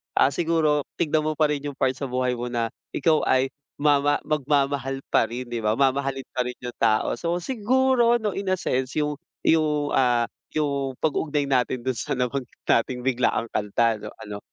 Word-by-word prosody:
ah, 135 - +4
siguro 155 -2 +1 0.2
tignan 155 -1 +2
mo 155 - -1
pa 155 0 +3
rin 145 -1 -2
yung 140 - -6
part 130 -1 +1
sa 140 0 -4
buhay 125 0 0
mo 120 - -3
na 115 -1 -1 0.2
ikaw 155 +2 +3
ay 130 +1 +2 0.3
mama 145 0 +3
magmamahal 140 -2 0
pa 115 - +4
rin, 125 +1 -6
'di 120 - -2
ba? 105 +1 +2
Mamahalin 135 0 0
pa 125 - +1
rin 125 - -5
yung 120 - -5
tao, 110 -1 +2
so 170 0 -1
siguro 250 0 +3
'no, 210 -2 -1
in 195 -1 -4
a - - +4
sense 130 -7 -1
yung 150 0 0 0.3
yung, 150 -2 +2
ah, 120 -2 +3 0.3
yung 140 -3 -1
pag-uugnay 150 -1 +1
natin 125 -2 0
dun 130 - +1
sa 115 - -2
nabanggit 125 0 -2 0.2
nating 125 +2 +2
biglaang 125 -2 +1
kanta 105 +2 +1
'no. - - -8
Ano, 105 -1 -6
135 Hz, 185 wpm, -24 LUFS, 125-150 Hz, 0.3 s, ah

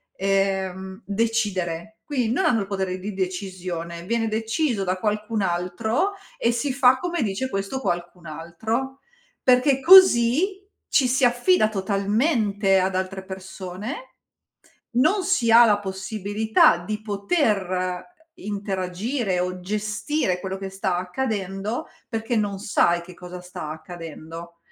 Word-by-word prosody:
ehm, 190 0 -1
decidere. 205 -3 -1
Quindi 250 -6 -1
non 290 +10 +1
hanno 225 -3 +3
il 195 - -4
potere 190 -2 -2
di 205 +3 -5
decisione, 180 -3 -4
viene 225 +4 0
deciso 225 +1 0
da 185 0 0
qualcun 210 +2 -1
altro 190 - 0 0.3
e 235 - +2
si 240 +4 -1
fa 255 -1 +5
come 350 -1 -2
dice 215 +5 -2
questo 195 +4 -3
qualcun 175 -3 -3
altro. 220 - -4 0.4
Perché 260 +2 +4
così 370 - +6 0.3
ci 270 -4 +4
si 255 +1 +3
affida 245 - +3
totalmente 205 - +1
ad 185 0 0
altre 190 0 -3
persone, 190 - -7 0.8
non 315 +11 +3
si 355 -12 +2
ha 235 +1 +9
la 205 -2 +4
possibilità 205 +1 +2
di 210 +5 -5
poter 200 - -1 0.2
interagire 200 - -2
o 180 0 -3
gestire 210 +2 -1
quello 190 0 -4
che 195 0 -6
sta 190 -1 -1
accadendo 195 +1 -3 0.2
perché 225 +1 -2
non 205 -2 0
sai 175 -4 +2
che 180 +1 -12
cosa 180 0 -9
sta 180 -3 -7
accadendo. 165 +1 -9
200 Hz, 125 wpm, -24 LUFS, 185-235 Hz, 0.8 s, ha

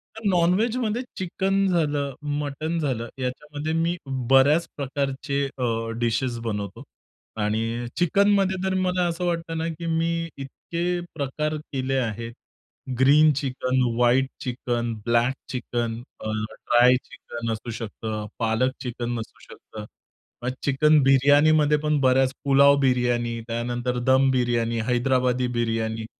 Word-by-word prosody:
तर 220 - -10
नॉन-व्हेजमध्ये 215 +7 +1 0.2
चिकन 195 +2 0
झालं, 145 -6 0 0.3
मटण 155 +3 -3
झालं 125 -6 -2
याच्यामध्ये 150 +4 -4
मी 165 +2 +1 0.3
बऱ्याच 145 +5 +5
प्रकारचे 140 0 -2
अ, 115 -2 -1
डिशेस 120 +1 0
बनवतो 105 -3 -4 0.6
आणि 115 +3 -1
चिकनमध्ये 195 +2 +3
तर 190 0 0
मला 180 -1 +1
असं 170 +1 -2
वाटतं 165 -1 -2
ना, 165 +1 -1
की 165 +1 -6
मी 165 0 0
इतके 170 +5 -6 0.3
प्रकार 150 +2 -2
केले 135 -3 -3
आहेत 115 -1 -3 0.7
green 150 +3 +6
chicken, 130 -1 -1
white 125 +2 +3
chicken, 120 -2 -2
black 120 +2 +2 0.2
chicken 120 -2 -3 0.2
अ, 110 - -4
ड्राय 120 +3 +3
चिकन 115 -1 -6
असू 110 +2 -5
शकतं, 110 -1 -5
पालक 115 +3 +1
चिकन 120 -1 -3
असू 110 - -9
शकतं. 105 -1 -10 0.6
मग 125 - 0
चिकन 150 +2 +4
बिर्याणीमध्ये 145 +3 +5
पण 150 -1 0
बऱ्याच 130 0 +3
पुलाव 140 +1 +6
बिर्याणी, 120 -3 +1
त्यानंतर 120 +1 -2
दम 135 +1 +5
बिर्याणी, 120 -2 0
हैदराबादी 125 0 +1
बिर्याणी. 115 -1 -1
130 Hz, 120 wpm, -24 LUFS, 120-155 Hz, 0.7 s, green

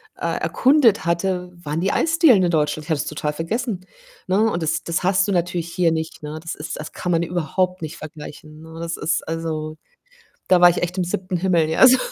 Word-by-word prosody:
äh, - - -2
erkundet 255 -6 +3
hatte 180 +1 -1
waren 150 +3 -2
die 195 - +1
Eisdielen 325 - +4
in 175 - +2
Deutschland. 150 -1 0
Ich - - -14
hatte 150 -3 +1
das - - -6
total 150 0 -3
vergessen, 185 - -3 0.4
ne, 210 +4 +3
und 170 -4 -2
das 155 - -1
das 170 +1 -2
hast 190 +1 +2
du - - 0
natürlich 175 -1 -1
hier 175 -3 +2
nicht, 160 -1 -4
ne? 150 +1 -6
Das 165 - -5
ist 160 +1 -6
das 155 - -7
kann 180 - -3
man 165 0 +2
überhaupt 180 +1 -1
nicht 155 -1 -6
vergleichen, 155 0 -10
ne? 160 0 -11
Das 165 0 -3
ist, 165 0 -1
also 160 -1 -4 0.7
da 180 -1 +4
war 175 - +9
ich 175 - -1
echt 180 +1 -3
im 185 - +1
7. 185 +1 -3
Himmel, 170 -3 +2
ja, 160 - +6
so 260 0 +7
170 Hz, 220 wpm, -21 LUFS, 160-185 Hz, 0.7 s, war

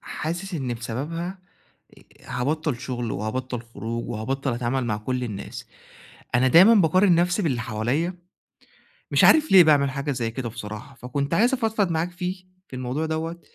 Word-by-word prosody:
حاسس 175 +4 -5
إن 130 -6 -2
بسببها 155 +11 -5 0.6
آآ - - -21 0.3
هابطّل 150 +1 -1
شغل 120 -3 -4
وهابطّل 125 +3 -3
خروج 115 0 -6
وهابطّل 130 +4 -2
أتعامل 125 +2 -1
مع 110 -3 -1
كل 125 +4 -3
الناس، 105 -4 -7 0.7
أنا 125 +2 +4
دايمًا 185 - +8
باقارن 185 0 +4
نفسي 175 +4 +2
باللي 135 -9 0
حواليّا، 130 +11 -2 0.9
مش - - +4
عارف 315 0 +6
ليه 190 -2 +9
باعمل 145 -3 +4
حاجة 140 +2 -3
زي 120 -4 -2
كده 120 0 -4
بصراحة، 110 +3 -8
فكنت 140 +4 -3
عايز 235 +9 +3
أفضفض 220 -6 0
معاك 165 +2 -1
فيه 180 +1 -5 0.2
في - - -9
الموضوع 130 +5 -2
دوّة 160 +2 -3
140 Hz, 155 wpm, -24 LUFS, 120-170 Hz, 0.9 s, ليه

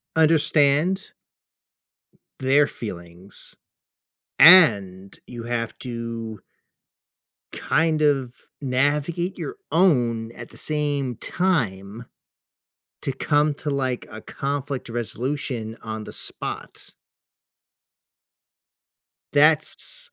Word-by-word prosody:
understand 155 +2 +3 1.3
their 140 +2 +4
feelings, 90 -2 -8 0.9
and 100 - +6
you 120 -2 -8
have 115 -1 -3
to 115 -4 -6 1.1
kind 155 0 +1
of 135 -4 0
navigate 145 +7 0
your 405 - -5 0.2
own 120 -10 +2
at 120 0 -10
the - - -15
same 145 -4 -1
time 115 - -2 1.0
to 135 - -1
come 145 +3 +1
to, 150 - -6
like, 130 -3 -2
a 110 - -8
conflict 140 -2 -4
resolution 120 0 -4
on 110 -1 -5
the - - -9
spot. - - -6 2.4
That's 155 - +2
135 Hz, 80 wpm, -23 LUFS, 115-150 Hz, 2.4 s, and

